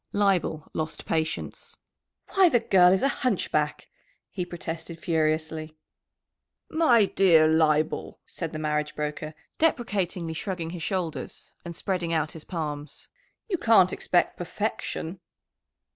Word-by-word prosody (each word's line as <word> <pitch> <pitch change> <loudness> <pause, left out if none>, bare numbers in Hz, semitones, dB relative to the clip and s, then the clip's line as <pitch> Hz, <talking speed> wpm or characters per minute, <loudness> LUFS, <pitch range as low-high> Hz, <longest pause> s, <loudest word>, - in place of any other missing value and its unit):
Leibel 190 -6 +1
lost 160 0 -4
patience. 160 -1 -3 0.6
"Why, 385 -3 +6
the 245 -6 +4
girl 180 -5 +5
is 190 - +2
a - - +5
hunchback!" 155 - 0 0.5
he 185 - -3
protested 165 -1 -6
furiously. 155 -1 -1 0.9
"My 250 -10 +5
dear 170 -5 +5
Leibel," 155 -1 +1
said 165 -3 -5
the 155 - -5
marriage 150 -1 -1
broker, 150 +1 -4 0.2
deprecatingly 195 - 0
shrugging 170 -1 -4
his 175 -1 -6
shoulders 180 -3 -4
and 170 -1 -7
spreading 175 -2 -2
out 155 -1 0
his 160 - -9
palms. 150 -4 -5 0.4
"You 370 -6 -1
can't 200 -6 +5
expect 175 -1 +1
perfection!" 180 -2 -4
165 Hz, 120 wpm, -26 LUFS, 155-190 Hz, 0.9 s, Why